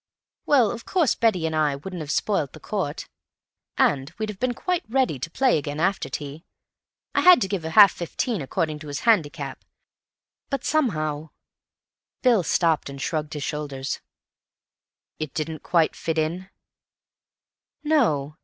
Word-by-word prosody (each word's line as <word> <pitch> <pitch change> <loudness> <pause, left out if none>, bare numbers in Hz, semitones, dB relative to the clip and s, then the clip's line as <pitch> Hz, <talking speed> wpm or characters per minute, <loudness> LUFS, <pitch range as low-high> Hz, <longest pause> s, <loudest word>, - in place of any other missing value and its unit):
Well, 250 -8 +4
of 235 -1 -7
course 345 -8 +2
Betty 200 -8 +1
and 160 -1 -1
I 150 -2 +2
wouldn't 180 +6 -7
have 150 -2 -6
spoilt 155 -4 0
the - - -11
court, 185 -8 -3 0.7
and 135 +1 +2
we'd 215 0 -3
have 205 -2 -7
been 250 -1 0
quite 360 +4 -1
ready 250 - +1
to 150 - -4
play 255 - +2
again 145 +1 -5
after 195 +4 0
tea—I 145 +2 -7
had 360 -4 +8
to 195 - +1
give 195 -2 -2
her 160 - -5
half 200 +3 +8
fifteen 195 - -3
according 150 +3 -2
to 155 - -10
his 145 - -4
handicap—but 165 - -3
somehow—" 155 - 0 0.9
Bill 240 -6 +5
stopped 165 -3 +1
and 140 0 -8
shrugged 155 +1 -3
his 145 - -4
shoulders. 140 -2 -4 1.2
"It 155 -1 -5
didn't 155 -1 -3
quite 165 -3 +2
fit 165 -1 -3
in?" 170 +5 -2 1.3
"No. 155 - +1
165 Hz, 145 wpm, -24 LUFS, 150-220 Hz, 1.3 s, had